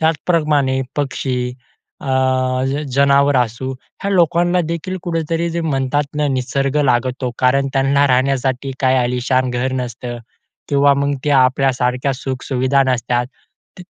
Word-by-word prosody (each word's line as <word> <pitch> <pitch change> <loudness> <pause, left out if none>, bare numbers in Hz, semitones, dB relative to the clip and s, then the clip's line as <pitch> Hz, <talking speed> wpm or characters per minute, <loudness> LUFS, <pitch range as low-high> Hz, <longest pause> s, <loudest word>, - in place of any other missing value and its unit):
त्याचप्रमाणे 150 -4 +1 0.2
पक्षी, 135 -2 -2 0.6
अ, - - -9 0.9
जनावर 140 +1 +4
असू, 125 +2 -1 0.3
ह्या 200 - -1
लोकांना 175 0 +3
देखील 175 +3 -4
कुठेतरी 165 -1 -1
जे 170 +1 -2
म्हणतात 145 -2 0
ना, 150 0 +1
निसर्ग 135 +2 -1
लागतो. 125 0 0
कारण 135 +2 +2
त्यांना 140 +1 +3
राहण्यासाठी 130 0 0
काही 130 -1 +3
अलिशान 125 +1 0
घर 125 +2 -1
नसतं 120 0 -6 0.5
किंवा 140 0 +4
मग 140 +1 0
ते 150 - +1
आपल्या 135 +1 +3
सारख्या 125 +2 -1
सुख 130 0 -5
सुविधा 130 +1 +2
नसतात. 125 -1 0 0.5
तर - - -8
135 Hz, 130 wpm, -18 LUFS, 130-145 Hz, 0.9 s, जनावर